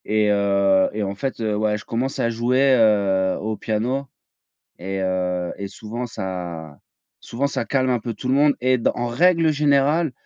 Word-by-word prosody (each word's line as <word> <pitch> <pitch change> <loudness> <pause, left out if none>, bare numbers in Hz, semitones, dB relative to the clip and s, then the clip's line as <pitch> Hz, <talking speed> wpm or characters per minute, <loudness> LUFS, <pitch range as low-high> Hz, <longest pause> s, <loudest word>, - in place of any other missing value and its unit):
Et 105 0 +1
heu, 100 -1 +3
et 105 0 -2
en 100 0 -3
fait 130 +6 -4
heu, 110 -2 -1
ouais, 105 0 0
je - - -12
commence 130 +4 -2
à 115 - +1
jouer, 125 +4 +2
heu, 100 -4 +2
au 110 +1 -3
piano 120 +7 -2 0.7
et 95 +2 -4
heu, 90 -1 -1
et 100 - -5
souvent 110 +5 -6
ça 85 - -6 0.4
souvent 135 +5 -2
ça 140 - -3
calme 130 -2 0
un 125 -1 +1
peu 115 +1 -5
tout 125 +4 -6
le - - +3
monde. 145 +1 +4
Et 130 +1 +3
dans 115 - 0
en 120 0 -2
règle 165 +5 +3
générale, 145 +2 +2
110 Hz, 185 wpm, -22 LUFS, 100-130 Hz, 0.7 s, monde